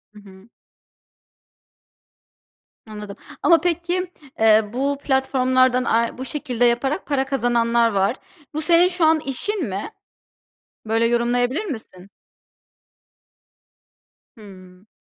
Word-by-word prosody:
I - - -12
hı. 195 +1 -17 2.4
Anladım 210 -2 -9 0.3
ama 335 -3 +5
peki, 350 +1 -2 0.3
eee, 220 -1 +4
bu 280 +3 -1
platformlardan 255 -1 +2
ay 230 0 0
bu 260 - -6
şekilde 250 -3 -1
yaparak 265 +8 0
para 275 -2 0
kazananlar 235 -3 +1
var. 200 +3 +1 0.4
Bu 310 - -3
senin 340 +2 +4
şu 360 -2 0
an 315 0 +4
işin 320 - -3
mi? 200 - -5 0.9
Böyle 225 +1 +1
yorumlayabilir 245 - 0
misin? 220 - -9 2.3
Hımm. 185 -2 -15
245 Hz, 100 wpm, -21 LUFS, 220-295 Hz, 2.4 s, ama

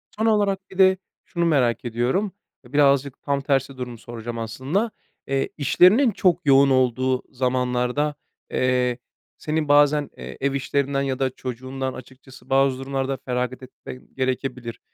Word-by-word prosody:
Son 220 - -1
olarak 200 -3 +1
bir 190 - -12
de 190 -1 +6 0.3
şunu 170 -1 -1
merak 130 -8 +2
ediyorum: 125 - 0 0.3
E, 120 - -17
birazcık 140 -2 +3
tam 140 -1 -1
tersi 135 -1 0
durumu 125 -2 -6
soracağım 115 0 -7
aslında. 135 - -2 0.4
Eee, 135 0 0
işlerinin 185 - +5
çok 180 -4 +1
yoğun 140 0 +6
olduğu 130 0 +1
zamanlarda, 125 +3 0 0.4
eee, 125 -1 +1 0.4
senin 155 0 -2
bazen, 145 0 +4
eee, - - -8
ev 140 0 +1
işlerinden 140 0 0
ya 135 -1 -2
da 135 -1 +1
çocuğundan, 130 +1 -5
açıkçası, 130 +1 -14
bazı 135 -1 +3
durumlarda 135 0 -2
feragat 125 0 -2
etmen 130 0 -11
gerekebilir. 130 -2 -3
135 Hz, 140 wpm, -23 LUFS, 125-145 Hz, 0.4 s, de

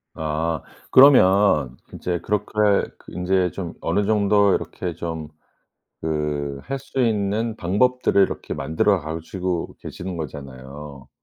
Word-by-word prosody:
아. 80 0 -2 0.3
그러면 95 - +6 0.2
이제 90 -1 -2
그렇게 100 +3 -2 0.5
그 - - -15
인제 90 0 +1
좀 90 -4 -6
어느 105 - 0
정도 100 -1 +3
이렇게 90 -2 -3
좀 80 -2 -5 0.8
그 75 -3 -2
할 135 +1 -4
수 135 0 -8
있는 110 0 0
방법들을 105 +3 +2
이렇게 - - -2
만들어 80 +7 +1
가시고 85 +3 -4
계시는 90 0 -6
거잖아요. 70 -1 -8
90 Hz, 245 characters per minute, -22 LUFS, 75-100 Hz, 0.8 s, 그러면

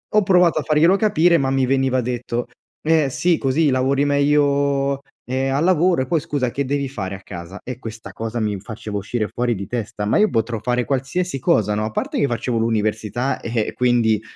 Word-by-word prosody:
Ho 215 - +6
provato 180 -4 +4
a - - -3
farglielo 155 +5 +4
capire, 175 -5 +3
ma 135 -3 0
mi 135 -1 +2
veniva 130 0 +1
detto: 120 0 -3 0.4
"Eh, 155 -3 +3
sì, 170 +5 +1
così 145 +3 +1
lavori 135 +2 +1
meglio, 140 -1 +2 0.3
ehm, 130 +2 -1
al 140 +3 +1
lavoro 175 -3 +3
e - - -9
poi, 170 -2 +1
scusa, 140 -5 -2
che 140 +3 -2
devi 140 0 -1
fare 100 -7 -5
a 95 - -11
casa?" 90 +1 -9
E 125 -1 -6
questa 115 -2 -8
cosa 115 +1 -4
mi 105 -2 -1
faceva 105 0 -6
uscire 105 +2 -2
fuori 120 -1 -1
di 100 0 -5
testa, 110 -3 -4
ma 105 - +2
io 215 0 +4
potrò 115 0 -1
fare 125 +2 0
qualsiasi 140 +4 -2
cosa, 105 -4 +2
no, 105 +1 -1
a 110 - -4
parte - - -2
che 140 - +2
facevo 120 -1 -2
l'università, 110 +2 -1
e 115 -2 -2
quindi, 120 -4 +2
130 Hz, 200 wpm, -21 LUFS, 115-145 Hz, 0.4 s, Ho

